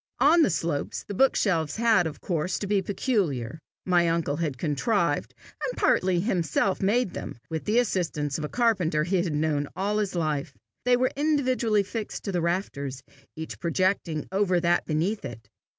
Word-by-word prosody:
On 330 Hz, +4 st, +6 dB
the 310 Hz, -, +4 dB
slopes 165 Hz, -4 st, -2 dB
the -, -, -5 dB
bookshelves 185 Hz, -, +2 dB
had 220 Hz, -7 st, +3 dB
of 155 Hz, -, -8 dB
course 175 Hz, 0 st, -1 dB
to -, -, -4 dB
be 200 Hz, 0 st, +1 dB
peculiar. 170 Hz, -, -1 dB, 0.3 s
My 175 Hz, -2 st, +3 dB
uncle 165 Hz, -3 st, 0 dB
had 155 Hz, -6 st, -2 dB
contrived, 160 Hz, -, 0 dB, 0.3 s
and -, -, -3 dB
partly 185 Hz, -1 st, +2 dB
himself 185 Hz, -2 st, 0 dB
made 205 Hz, +1 st, +1 dB
them, -, -, -6 dB
with 160 Hz, -1 st, -3 dB
the 215 Hz, +3 st, +1 dB
assistance 165 Hz, -, 0 dB
of -, -, -4 dB
a 150 Hz, -, -3 dB
carpenter 185 Hz, -11 st, +1 dB
he 185 Hz, +4 st, 0 dB
had 170 Hz, -4 st, -2 dB
known 150 Hz, -1 st, 0 dB
all 205 Hz, +2 st, 0 dB
his 200 Hz, -3 st, -2 dB
life. 150 Hz, -4 st, -2 dB, 0.3 s
They 250 Hz, 0 st, +4 dB
were 255 Hz, +1 st, +1 dB
individually 255 Hz, -8 st, +2 dB
fixed 215 Hz, +2 st, -5 dB
to 200 Hz, -, -3 dB
the 175 Hz, -2 st, 0 dB
rafters, 140 Hz, -7 st, -2 dB, 0.3 s
each 160 Hz, 0 st, -7 dB
projecting 170 Hz, -2 st, 0 dB
over 190 Hz, -2 st, +2 dB
that 175 Hz, 0 st, +1 dB
beneath 170 Hz, +8 st, -1 dB
it. 120 Hz, -5 st, -8 dB
180 Hz, 170 wpm, -26 LUFS, 155-210 Hz, 0.3 s, On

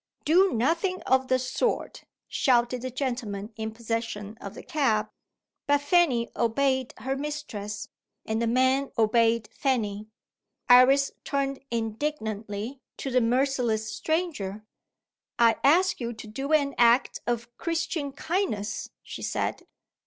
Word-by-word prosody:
"Do 365 Hz, +5 st, +5 dB
nothing 330 Hz, -, 0 dB
of 260 Hz, 0 st, +2 dB
the 255 Hz, -, +3 dB
sort!" 255 Hz, -, -2 dB, 0.2 s
shouted 245 Hz, -2 st, +2 dB
the 255 Hz, -, -3 dB
gentleman 240 Hz, -5 st, -4 dB
in 220 Hz, 0 st, -4 dB
possession 225 Hz, -2 st, -4 dB
of 200 Hz, +1 st, -7 dB
the -, -, -9 dB
cab. 230 Hz, -9 st, +1 dB, 0.6 s
But 285 Hz, 0 st, +4 dB
Fanny 290 Hz, -6 st, +2 dB
obeyed 260 Hz, +2 st, +1 dB
her 265 Hz, +4 st, -2 dB
mistress; 260 Hz, -8 st, -5 dB, 0.4 s
and 220 Hz, +1 st, -1 dB
the 235 Hz, -, +1 dB
men 260 Hz, +3 st, +2 dB
obeyed 230 Hz, 0 st, +3 dB
Fanny. 215 Hz, -6 st, -1 dB, 0.6 s
Iris 260 Hz, +3 st, +6 dB
turned 275 Hz, -1 st, -2 dB
indignantly 225 Hz, -1 st, -3 dB, 0.2 s
to 270 Hz, -, -4 dB
the 250 Hz, 0 st, +3 dB
merciless 240 Hz, -3 st, +1 dB
stranger. 285 Hz, -, -2 dB, 0.7 s
"I 230 Hz, -1 st, +5 dB
ask 355 Hz, +7 st, +4 dB
you 240 Hz, -1 st, -3 dB
to 220 Hz, 0 st, -10 dB
do 270 Hz, +7 st, -4 dB
an 285 Hz, -3 st, +3 dB
act 240 Hz, +2 st, +4 dB
of 240 Hz, 0 st, -2 dB
Christian 325 Hz, -3 st, -2 dB
kindness," 270 Hz, -, -2 dB
she -, -, -8 dB
said. -, -, -2 dB
250 Hz, 125 wpm, -27 LUFS, 225-280 Hz, 0.7 s, Iris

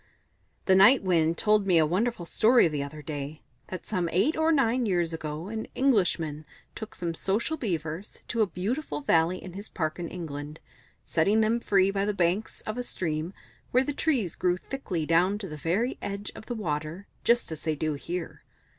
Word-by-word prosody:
"The 190 Hz, -, +5 dB
Night 205 Hz, +7 st, +7 dB
Wind 170 Hz, -3 st, +2 dB
told 210 Hz, -2 st, +3 dB
me 180 Hz, -3 st, +5 dB
a 160 Hz, -, +5 dB
wonderful 185 Hz, +3 st, 0 dB
story 230 Hz, +5 st, +5 dB
the 150 Hz, -3 st, -2 dB
other 150 Hz, +2 st, -7 dB
day 145 Hz, +1 st, -6 dB, 0.2 s
that 185 Hz, -, -7 dB
some 180 Hz, -5 st, -1 dB
eight 205 Hz, -, +2 dB
or 315 Hz, +1 st, +3 dB
nine 255 Hz, -5 st, +2 dB
years 175 Hz, -4 st, +1 dB
ago 155 Hz, +1 st, -5 dB
an 220 Hz, +1 st, -4 dB
Englishman 175 Hz, -, +1 dB, 0.3 s
took 220 Hz, -, -8 dB
some 170 Hz, -2 st, -3 dB
Social 210 Hz, -, 0 dB
Beavers 175 Hz, -, -4 dB
to 230 Hz, -, 0 dB
a 215 Hz, -, +4 dB
beautiful 185 Hz, -, -3 dB
valley 165 Hz, +5 st, +3 dB
in 185 Hz, -, -8 dB
his 200 Hz, +3 st, -8 dB
park 155 Hz, -1 st, -2 dB
in 170 Hz, -, -3 dB
England, 150 Hz, -3 st, -6 dB, 0.5 s
setting 200 Hz, +7 st, +3 dB
them 220 Hz, +2 st, +2 dB
free 195 Hz, -4 st, +3 dB
by 195 Hz, 0 st, 0 dB
the 210 Hz, 0 st, -1 dB
banks 180 Hz, +4 st, 0 dB
of 215 Hz, +3 st, -4 dB
a -, -, -1 dB
stream, 160 Hz, -6 st, -2 dB, 0.4 s
where 255 Hz, +1 st, +3 dB
the 290 Hz, -, -2 dB
trees 260 Hz, -, 0 dB
grew 180 Hz, -1 st, +1 dB
thickly 185 Hz, -, -4 dB
down 175 Hz, +5 st, +3 dB
to 205 Hz, -2 st, -6 dB
the 155 Hz, -, -7 dB
very 185 Hz, -, -1 dB
edge 200 Hz, +1 st, -4 dB
of -, -, -11 dB
the 240 Hz, -, -3 dB
water, 160 Hz, -1 st, -3 dB, 0.2 s
just 235 Hz, -6 st, +2 dB
as 160 Hz, -, -6 dB
they 155 Hz, -1 st, -1 dB
do 155 Hz, +1 st, -1 dB
here. 170 Hz, +4 st, -5 dB
185 Hz, 190 wpm, -28 LUFS, 160-220 Hz, 0.5 s, Night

